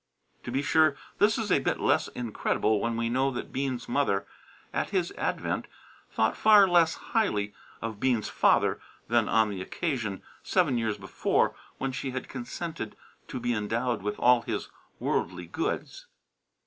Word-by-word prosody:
To - - -4
be 135 +3 0
sure, 155 -1 +4 0.2
this 205 +1 +4
is 220 -4 -2
a 145 - +5
bit 135 - -1
less - - +2
incredible 110 -2 0
when 115 0 -1
we 115 0 0
know 130 +3 +2
that 125 - -6
Bean's 130 -2 -2
mother, 120 -7 +1 0.5
at - - -1
his - - 0
advent, - - -2 0.4
thought 110 0 +1
far 210 -2 +7
less 170 -2 +4
highly 105 - 0 0.3
of 110 -2 -4
Bean's 120 -4 +1
father - - +3 0.3
than - - +3
on 110 -2 +3
the 95 -2 -5
occasion, 110 - -3 0.2
seven 150 -10 +2
years 110 -2 -1
before, - - +1 0.2
when 135 0 -2
she 135 +1 -4
had 130 0 -4
consented 130 -1 -5 0.3
to 130 - -5
be 120 0 0
endowed 115 +3 -1
with 105 +1 -3
all 125 -1 +5
his - - -4 0.3
worldly - - -1
goods. - - -3
125 Hz, 160 wpm, -28 LUFS, 110-145 Hz, 0.5 s, far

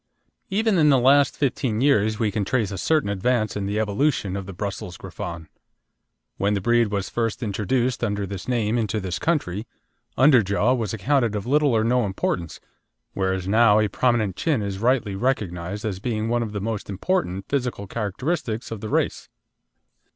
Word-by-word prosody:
Even 210 -1 +2
in 150 -1 +5
the 135 - +5
last 135 +2 +4
fifteen 130 -5 0
years 110 -6 +3
we 110 -2 0
can 105 0 -1
trace 110 -1 0
a 95 - -4
certain 155 - +2
advance 110 +1 0
in 100 -1 -2
the 105 +2 -1
evolution 105 -2 0
of 100 -1 -5
the - - -6
Brussels 95 -2 -5
Griffon. 85 -2 -7 0.9
When 100 +1 +1
the - - 0
breed 120 +3 +3
was 100 -2 -2
first 115 +1 -2
introduced 115 +4 -1
under 105 -3 -1
this 100 +1 -7
name 120 -2 +1
into 110 -1 -1
this 95 -3 -3
country, 115 - -1 0.5
underjaw 120 -3 +4
was 110 -6 -2
accounted 120 0 +1
of 105 - -3
little 145 +3 +3
or 110 - +2
no 125 +2 +2
importance, 90 -4 -3 0.5
whereas 95 -1 -1
now 110 +1 +5
a 105 -1 +1
prominent 115 -7 +1
chin 145 -10 0
is 100 -1 -4
rightly 120 -3 +1
recognised 100 -4 -2
as 100 -4 -3
being 110 0 -2
one 120 0 +1
of 110 -2 -3
the 105 - -3
most 110 -1 -4
important 100 - -1
physical 125 -7 -2
characteristics 115 - -3
of 110 -3 -5
the 110 - -5
race. - - -1
110 Hz, 175 wpm, -23 LUFS, 100-125 Hz, 0.9 s, in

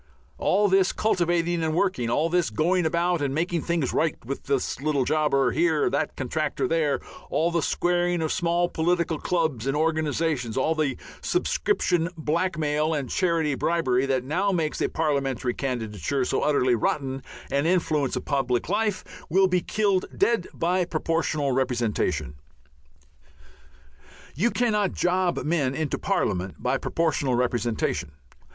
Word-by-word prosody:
All 205 +2 +3
this 190 -1 +3
cultivating 175 -4 +1
and 160 -1 0
working, 170 -11 0
all 150 +7 +2
this 175 0 +1
going 175 +2 +1
about 170 0 +1
and 140 -1 -1
making 170 +1 0
things 165 -5 -1
right 160 -1 +1
with 135 +3 -5
this 135 -1 -1
little 145 -3 +1
jobber 150 -2 +2
here, 160 -2 +2
that 145 +3 -1
contractor 145 +3 -2
there, 160 -3 +1 0.3
all 165 +2 +1
the 170 -1 +1
squaring 175 +1 +1
of 155 - -1
small 175 0 +1
political 170 -1 0
clubs 155 -9 -1
and 135 +2 0
organizations, 155 -6 0
all 155 +5 +2
the 155 -4 -1 0.2
subscription 185 - +1
blackmail 155 -1 0
and 135 -5 -3
charity 165 -5 +1
bribery, 135 -4 +1
that 130 -2 0
now 180 +9 0
makes 160 -4 -1
a - - +1
Parliamentary 135 -5 -1
candidature 125 - -2
so - - 0
utterly 130 -4 +2
rotten 135 +3 -1 0.3
an 140 +3 +1
influence 155 -6 +1
upon 140 -2 -1
public 125 +3 0
life, 205 -1 0 0.3
will 190 +3 +4
be 180 -1 +1
killed 200 -1 +1
dead 215 -2 +2
by 180 +2 0
Proportional 160 -3 -1
Representation. 120 - 0 2.0
You 195 - +1
cannot 210 -6 +1
job 180 0 0
men 145 -5 0
into 155 -2 -2
Parliament 90 +1 -1
by - - -1
Proportional 145 -6 0
Representation. 120 - -1
160 Hz, 140 wpm, -25 LUFS, 135-175 Hz, 2.0 s, will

